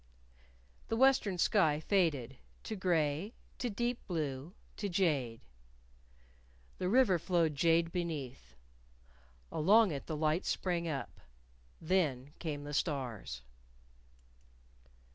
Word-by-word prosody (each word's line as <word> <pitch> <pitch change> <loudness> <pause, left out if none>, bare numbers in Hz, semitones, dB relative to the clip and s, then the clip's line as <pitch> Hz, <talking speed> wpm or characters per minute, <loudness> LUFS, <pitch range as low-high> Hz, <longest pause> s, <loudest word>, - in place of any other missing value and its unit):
The 225 - -1
western 250 -7 +4
sky 160 -5 +3
faded 155 - 0 0.3
to 220 - -4
gray, 175 +1 0 0.2
to 245 - -1
deep 240 +3 -1
blue, 155 0 -3 0.2
to 205 - -2
jade. 145 -11 0 1.4
The 180 - 0
river 215 -6 +4
flowed 170 -2 +1
jade 165 +3 +3
beneath. 140 - -5 1.0
Along 205 +5 +5
it 140 -2 -5
the 155 - -3
lights 155 +3 +1
sprang 175 -2 -1
up. 145 -4 -5 0.6
Then 150 -6 0
came 150 -4 -4
the 145 0 -6
stars. 120 - -2
165 Hz, 105 wpm, -33 LUFS, 145-190 Hz, 1.4 s, Along